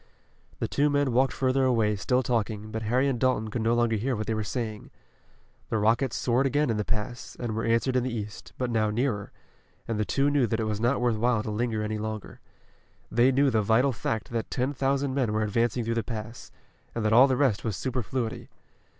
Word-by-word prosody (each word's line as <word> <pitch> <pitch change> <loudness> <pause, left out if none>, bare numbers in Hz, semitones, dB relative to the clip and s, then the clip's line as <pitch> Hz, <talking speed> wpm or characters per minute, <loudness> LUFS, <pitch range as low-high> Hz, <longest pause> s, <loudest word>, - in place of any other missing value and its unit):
The - - -2
two 145 +1 +2
men 145 -2 +1
walked 130 +1 +3
further 130 +1 +1
away, 115 -5 +2
still 125 +6 +1
talking, 110 -3 -2
but 110 - -3
Harry 125 +5 +1
and 130 -4 -1
Dalton 120 -4 +1
could 115 - -2
no 115 +1 +2
longer 120 -2 +2
hear 125 +5 -1
what 110 0 -3
they 110 - -1
were 110 0 -1
saying. 110 -1 -4 0.8
The 110 - 0
rockets 115 +4 +2
soared 125 +3 +2
again 145 -1 +1
in 110 - -1
the 105 - 0
pass, 120 +3 -4
and 120 -3 -3
were 115 - -2
answered 115 +3 +1
in 125 - +3
the 130 +1 -2
east, 105 -2 -6
but 125 -1 -2
now 110 -2 +2
nearer, 105 -2 -1 0.6
and 115 -2 -2
the - - +2
two 140 +6 +1
knew 140 -4 +3
that 115 -1 -1
it - - 0
was 105 -1 -2
not 120 +3 +2
worth 120 -3 +1
while 115 -1 +1
to 110 - -4
linger 110 0 -1
any 105 0 -2
longer. 110 -1 -6 0.7
They 120 +3 +4
knew 135 +1 +3
the 110 -2 +2
vital 115 +6 +3
fact 110 -1 -3
that 115 -1 -3
ten 130 +2 -1
thousand 135 0 0
men 130 -6 0
were 110 0 +1
advancing 115 +2 0
through 115 - 0
the 115 - 0
pass, 115 0 -7 0.4
and 115 -2 -2
that 110 - +3
all 125 +4 +8
the 130 -2 +1
rest 130 -8 +2
was 110 -5 -2
superfluity. 125 -2 -3
115 Hz, 225 wpm, -27 LUFS, 110-130 Hz, 0.8 s, all